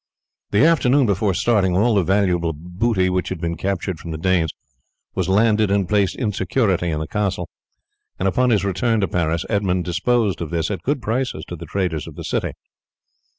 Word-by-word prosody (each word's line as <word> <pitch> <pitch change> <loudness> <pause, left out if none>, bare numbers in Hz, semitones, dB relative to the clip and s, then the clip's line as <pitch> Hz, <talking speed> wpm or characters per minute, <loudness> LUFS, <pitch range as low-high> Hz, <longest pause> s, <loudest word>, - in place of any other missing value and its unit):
The 105 +8 +4
afternoon 145 -4 +4
before 100 -2 +1
starting 95 -6 +2
all 115 +4 +3
the 100 - +4
valuable 90 -3 +1
booty 90 +5 0
which 90 0 -1
had 95 - -4
been 85 0 -2
captured 95 0 -3
from 85 - -8
the 80 - -4
Danes 85 -1 +1 0.6
was 95 -1 -1
landed 105 +1 +3
and 100 -2 +1
placed 100 -2 +1
in 115 -5 -1
security 95 -2 0
in 75 -2 -1
the 80 - -3
castle, 105 -3 -2 0.7
and 95 - 0
upon 125 +6 +2
his 105 -4 +2
return 110 +4 +1
to 95 - +1
Paris 85 -1 -1
Edmund 95 -4 0
disposed 95 +1 0
of 85 - -3
this 85 +3 -1
at 95 -5 -3
good 140 - -1
prices 125 +4 -2
to 90 - -5
the 85 0 -9
traders 90 -3 -2
of - - -10
the - - -7
city. - - -2
95 Hz, 195 wpm, -21 LUFS, 85-110 Hz, 0.7 s, The